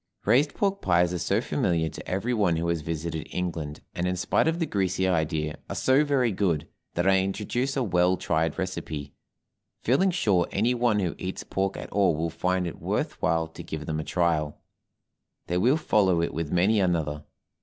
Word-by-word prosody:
RAISED 135 +7 +3
PORK 200 -1 0
PIES 90 -1 +3
are 90 - -2
so 100 +6 +1
familiar 85 - 0
to - - -8
every 100 +7 -1
one 100 -7 +2
who 85 +1 -1
has 85 -2 0
visited 80 0 -4
England, 80 -5 -4
and, 90 +1 -1
in 90 - 0
spite 90 - +1
of 165 +1 +1
the 170 - 0
greasy 95 - 0
idea, 80 -3 -1
are - - -4
so 130 +3 +3
very 135 -5 +2
good, 90 -6 0 0.3
that 85 +2 +1
I 95 0 +5
introduce 115 +8 -1
a 135 - +2
well 90 -3 +2
tried 80 -2 0
recipe, 80 -6 -4 0.7
feeling 140 +11 +3
sure 100 - +2
any 115 +5 +1
one 120 -3 +2
who 90 -3 -1
eats 95 +1 -4
pork 95 0 -2
at - - -8
all 95 -5 +3
will 80 +2 -2
find 90 +2 0
it 85 - -6
worth - - -2
while 80 0 +2
to - - -10
give 75 -1 -6
them 80 0 -2
a - - -2
trial; 80 -3 0 0.9
they 90 +1 0
will 125 +10 +4
follow 100 - +2
it - - -2
with 80 -2 -3
many 95 +5 +3
another. 80 -5 0
90 Hz, 195 wpm, -26 LUFS, 80-105 Hz, 0.9 s, I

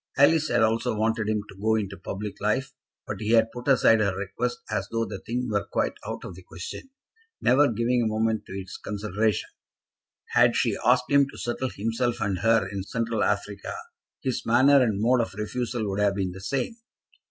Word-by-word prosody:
Alice 155 +3 +5
had - - +2
also 110 0 +1
wanted 110 0 0
him 105 -1 0
to - - -12
go 110 +1 +3
into 100 -3 -2
public 100 +1 -6
life, 130 +6 0 0.3
but - - -5
he 110 +2 0
had 115 -1 +4
put 120 +2 -8
aside 125 -4 +5
her 100 -3 +1
request 120 +6 -3
as 100 - -1
though 115 0 0
the - - -6
thing 125 +2 -3
were 105 -3 -1
quite - - 0
out - - -5
of - - -7
the 90 - -12
question, 90 - -8 0.5
never 140 +2 +4
giving 120 +2 +1
a 115 - +1
moment 110 0 0
to - - -8
its 95 -1 -6
consideration. 105 +1 -1 0.8
Had - - +4
she - - +1
asked 125 +2 +3
him 140 -1 +5
to - - -12
settle 125 +2 -2
himself 115 +3 -1
and 100 -4 -1
her 115 -3 +3
in 100 0 -4
Central 115 +3 -1
Africa, 100 0 -2 0.5
his 130 -2 -1
manner 135 +4 +5
and 110 -5 +1
mode 120 +3 +3
of 115 - -4
refusal 115 +1 -3
would 100 0 -2
have 100 -1 +2
been 95 -2 -1
the 95 +1 -10
same. 135 - -2
110 Hz, 200 wpm, -26 LUFS, 100-120 Hz, 0.8 s, Alice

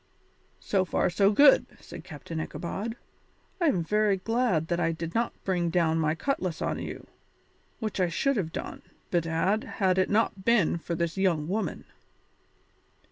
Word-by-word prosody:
"So 195 -2 +1
far 185 0 0
so 195 +3 +4
good," 280 +6 +6
said - - -10
Captain 160 +2 -7
Ichabod. 200 +8 -4 0.7
"I 340 - +4
am 180 - +2
very 210 +2 +2
glad 225 -6 0
that 175 0 0
I 165 -1 +1
did 165 0 -5
not 235 +1 0
bring 175 -3 0
down 165 -1 +2
my 155 0 +1
cutlass 185 - -2
on - - -2
you, - - -7 0.7
which 215 -3 -4
I 180 -2 +2
should 275 +11 +1
have 165 -5 -2
done, - - -6 0.3
bedad, 170 +5 +1
had 190 -2 +2
it 185 - +2
not 205 -2 +1
been 205 -7 +3
for 170 +1 -4
this 170 +1 -2
young 170 -6 +1
woman." 195 -2 -3
185 Hz, 160 wpm, -28 LUFS, 165-210 Hz, 0.7 s, good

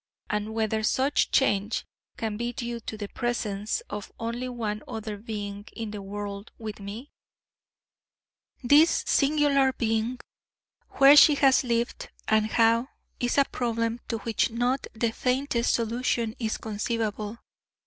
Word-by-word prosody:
And 210 +1 -2
whether 220 -1 0
such 265 +6 +2
change 210 -5 +1 0.3
can 220 -2 -2
be 240 +2 -3
due 240 -3 -4
to 220 -1 -7
the 205 -1 -5
presence 215 -3 -2
of 210 -1 -6
only 235 +2 -3
one 215 -4 -3
other 220 -1 -5
being 205 -1 -6
in 225 -2 -5
the 210 -1 -6
world 200 +1 -6
with 215 -2 -7
me? 210 +8 -8 1.5
This 295 +6 +5
singular 280 -2 +3
being! 225 +1 -1 0.7
Where 275 +1 +8
she 295 0 +8
has 270 -2 +4
lived 235 -1 -1 0.2
and 220 0 +3
how 230 +2 +3 0.3
is 245 +2 0
a 280 - +6
problem 230 -2 -2
to 230 - -2
which 225 0 0
not 245 +3 -1
the 225 0 0
faintest 250 0 0
solution 230 -1 -1
is 220 -2 -1
conceivable. 215 0 -3
230 Hz, 135 wpm, -27 LUFS, 215-245 Hz, 1.5 s, Where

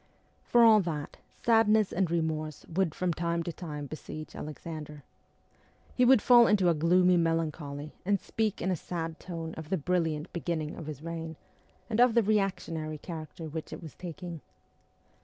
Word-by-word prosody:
For 240 -1 +5
all 220 -2 +8
that 160 -6 -4 0.3
sadness 220 -3 +4
and 180 -1 +1
remorse 160 -2 -2
would 170 -2 -1
from 180 -2 0
time 170 0 -1
to 170 - -4
time 150 -4 -6
besiege 155 +1 -8
Alexander. 150 -1 -7 0.9
He 250 - +3
would 255 -3 +6
fall 240 -2 +7
into 195 -4 +4
a - - +4
gloomy 180 +3 +4
melancholy, 155 -3 -1
and 200 +1 +2
speak 215 +1 -2
in 190 - +1
a - - +1
sad 165 -1 -5
tone 165 -2 -6
of 160 -1 -8
the 190 - +1
brilliant 160 -1 -1
beginning 165 -3 -2
of 160 - -8
his 150 -1 -7
reign, 165 -1 -5 0.5
and 225 -1 -1
of 245 -1 +5
the 235 - +5
reactionary 180 -7 -1
character 160 0 -7
which 155 +1 -6
it - - -7
was 155 - -9
taking. 170 -2 -7
165 Hz, 165 wpm, -29 LUFS, 155-190 Hz, 0.9 s, all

